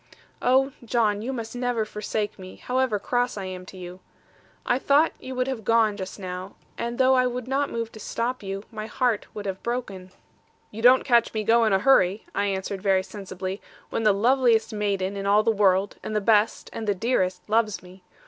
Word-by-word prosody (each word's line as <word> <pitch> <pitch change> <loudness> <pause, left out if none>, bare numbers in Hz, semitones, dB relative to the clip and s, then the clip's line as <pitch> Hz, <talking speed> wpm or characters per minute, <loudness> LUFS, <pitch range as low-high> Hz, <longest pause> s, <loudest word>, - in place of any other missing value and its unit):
Oh, 265 +2 +3
John, 220 -3 +1
you 245 +4 -3
must 230 -2 -5
never 245 -3 -1
forsake 210 0 -4
me, 185 0 -10
however 255 -3 0
cross 245 +3 -1
I 195 - -4
am 185 -1 -7
to 190 - -11
you. 180 0 -9 0.7
I 245 - +1
thought 285 +4 +3
you 260 0 -7
would 255 0 0
have 260 -5 -4
gone, 225 0 +3
just 190 -2 -7
now; 185 0 -7 0.2
and 235 0 -4
though 260 0 +4
I 255 -1 +4
would 250 0 -4
not 275 +2 0
move 230 -1 -4
to 220 - -12
stop 240 +4 -3
you, 195 0 -5
my 215 -1 -6
heart 240 -2 0
would 205 -1 -6
have 190 -1 -4
broken.' 210 -7 -4 0.6
'You 220 - -7
don't 250 +2 +6
catch 235 -3 +3
me 215 - 0
go 230 +2 +4
in 215 - +2
a - - +5
hurry,' 200 -3 +3
I 200 - 0
answered 195 0 -3
very 190 -2 +2
sensibly, 190 -1 -6 0.3
'when - - -1
the 215 -1 +5
loveliest 230 +1 +3
maiden 200 -2 -1
in 200 0 -3
all 205 +2 +4
the 225 - +3
world, 195 -2 +2
and 215 - -5
the - - +3
best, 215 +1 +2
and 220 - -5
the 205 - +2
dearest, 185 -4 -1
loves 215 -2 +1
me. 185 +1 -15
215 Hz, 205 wpm, -25 LUFS, 195-245 Hz, 0.7 s, don't